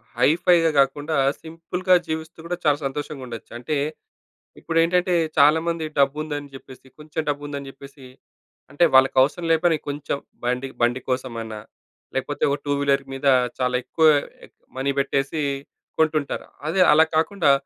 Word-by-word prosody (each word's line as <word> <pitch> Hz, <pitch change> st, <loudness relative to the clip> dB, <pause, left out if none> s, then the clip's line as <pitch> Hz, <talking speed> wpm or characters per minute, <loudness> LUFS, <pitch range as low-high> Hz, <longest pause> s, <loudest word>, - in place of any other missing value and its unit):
High 125 Hz, +3 st, +4 dB
ఫై‌గా 170 Hz, -3 st, +5 dB
గాకుండా 145 Hz, +3 st, +1 dB, 0.3 s
సింపుల్‌గా 170 Hz, +3 st, 0 dB
జీవిస్తూ 160 Hz, +1 st, -5 dB
గూడా 175 Hz, +1 st, -3 dB
చాలా 145 Hz, -1 st, +4 dB
సంతోషంగా 140 Hz, 0 st, -5 dB
ఉండొచ్చు. 115 Hz, -2 st, -9 dB
అంటే 125 Hz, +6 st, -3 dB, 0.8 s
ఇప్పుడేంటంటే 170 Hz, +2 st, +1 dB, 0.2 s
చాలా 150 Hz, +3 st, +6 dB
మంది 165 Hz, -2 st, -1 dB
డబ్బుందని 145 Hz, +1 st, 0 dB
జెప్పేసి 130 Hz, 0 st, -13 dB
కొంచెం 150 Hz, +1 st, -4 dB
డబ్బుందని 145 Hz, -1 st, -4 dB
జెప్పేసి. 135 Hz, -1 st, -13 dB, 0.6 s
అంటే 155 Hz, +4 st, +3 dB
వాళ్ళకి 130 Hz, 0 st, +5 dB
అవసరం 150 Hz, +6 st, 0 dB
లేకపోయినా 165 Hz, 0 st, +3 dB
కొంచెం 145 Hz, 0 st, -3 dB, 0.3 s
బండి 125 Hz, +2 st, -1 dB
బండి 120 Hz, +2 st, +2 dB
కోసమైనా 115 Hz, -4 st, -3 dB, 0.6 s
లేకపోతే 140 Hz, +2 st, -3 dB
ఒక 140 Hz, -, 0 dB
2 145 Hz, -, -1 dB
వీలర్ 140 Hz, -1 st, +1 dB
మీద 135 Hz, +1 st, -6 dB, 0.3 s
చాలా 125 Hz, -1 st, 0 dB
ఎక్కువ 160 Hz, +5 st, +2 dB, 0.7 s
మనీ 135 Hz, +1 st, 0 dB
పెట్టేసి 140 Hz, +2 st, -1 dB, 0.6 s
కొంటుంటారు. 155 Hz, -2 st, 0 dB, 0.2 s
అదే 180 Hz, +4 st, +1 dB
అలా 155 Hz, +2 st, +6 dB
కాకుండా 160 Hz, -1 st, +2 dB
145 Hz, 135 wpm, -23 LUFS, 135-160 Hz, 0.8 s, చాలా